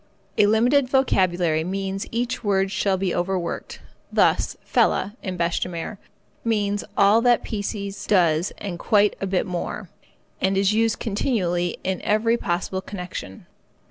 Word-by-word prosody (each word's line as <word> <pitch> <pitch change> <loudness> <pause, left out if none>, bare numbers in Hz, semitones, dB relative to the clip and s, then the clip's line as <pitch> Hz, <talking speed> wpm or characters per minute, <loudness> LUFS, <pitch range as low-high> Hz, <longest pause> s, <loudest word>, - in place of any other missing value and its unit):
A 205 - +6
limited 245 +5 +3
vocabulary 180 - +2
means 195 +2 -3
that - - -16
each 245 +2 -2
word 195 -2 +1
shall 190 0 +1
be 185 -1 -1
overworked. 180 0 -3 0.3
Thus, - - +2
fella, 205 +3 +1
in 185 -2 -4
bêche 170 0 0
de - - -1
mer, 175 +4 -6 0.4
means 205 -3 0
all 205 +3 +5
that 240 0 +3
piecee 200 -1 -4
does 175 -4 +3
and 180 -4 -5
quite 210 -1 +3
a 195 - -1
bit 185 -1 0
more, 180 +1 -4 0.5
and 190 0 +2
is 195 +1 +3
used 225 0 +2
continually 185 - -1
in 190 -1 -2
every 220 +2 +2
possible 190 -2 -2
connection. 180 - -7
195 Hz, 145 wpm, -23 LUFS, 180-215 Hz, 0.5 s, A